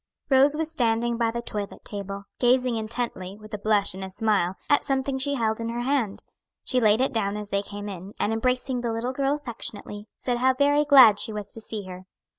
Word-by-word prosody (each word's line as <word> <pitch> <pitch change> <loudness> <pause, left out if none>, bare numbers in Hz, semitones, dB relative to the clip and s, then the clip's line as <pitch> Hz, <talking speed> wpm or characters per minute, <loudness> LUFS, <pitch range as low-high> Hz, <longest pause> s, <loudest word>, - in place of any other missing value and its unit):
Rose 275 +3 +5
was 320 0 -2
standing 235 -4 +1
by 230 -1 +1
the 235 +1 -4
toilet 205 -3 -6
table, 200 -1 -5 0.2
gazing 250 0 +3
intently, 220 -4 -4
with 215 0 -13
a 210 - -3
blush 205 -2 +2
and 190 +1 -7
a 190 - -5
smile, 195 -3 0
at 290 -1 +3
something 270 0 -1
she 285 +1 0
held 220 -3 0
in 230 - -3
her 235 +1 -3
hand. 245 -6 -1 0.4
She 255 -1 +1
laid 215 +1 +4
it 265 - +1
down 205 -2 -1
as 210 -1 -6
they 200 - +1
came 205 0 -7
in, 195 0 -8
and 220 - +1
embracing 250 +2 0
the 235 -1 -1
little 230 +3 -2
girl 275 +1 +1
affectionately, 220 -6 -6
said 245 -1 -2
how 260 +1 +3
very 290 +2 +3
glad 255 -8 +8
she - - -1
was 210 -1 -6
to 225 - -9
see 215 -1 -5
her. 185 0 -10
230 Hz, 220 wpm, -25 LUFS, 205-255 Hz, 0.4 s, glad